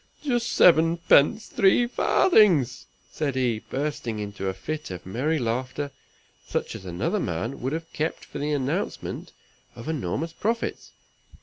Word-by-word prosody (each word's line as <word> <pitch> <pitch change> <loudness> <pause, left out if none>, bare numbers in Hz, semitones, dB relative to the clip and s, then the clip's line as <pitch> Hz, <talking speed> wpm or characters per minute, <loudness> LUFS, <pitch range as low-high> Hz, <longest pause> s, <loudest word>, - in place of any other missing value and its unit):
"Just 240 -5 0
seven 165 0 +5
pence 165 +5 +4
three 200 +5 +3
farthings," 195 - +3 0.2
said 145 -4 -2
he, 125 -4 +1
bursting 130 -4 -3
into 100 -2 -4
a 95 - 0
fit 155 +11 -5
of 90 -1 -7
merry 130 - 0
laughter, 130 +3 -2 0.6
such - - -2
as 95 - -9
another 85 -1 -1
man 95 +11 -3
would 130 +4 -2
have 165 0 -5
kept 155 +2 -2
for - - -8
the 150 +1 -1
announcement 145 +7 -2 0.4
of 115 - -9
enormous 155 - -2
profits. 230 +5 -3
145 Hz, 140 wpm, -25 LUFS, 115-165 Hz, 0.6 s, seven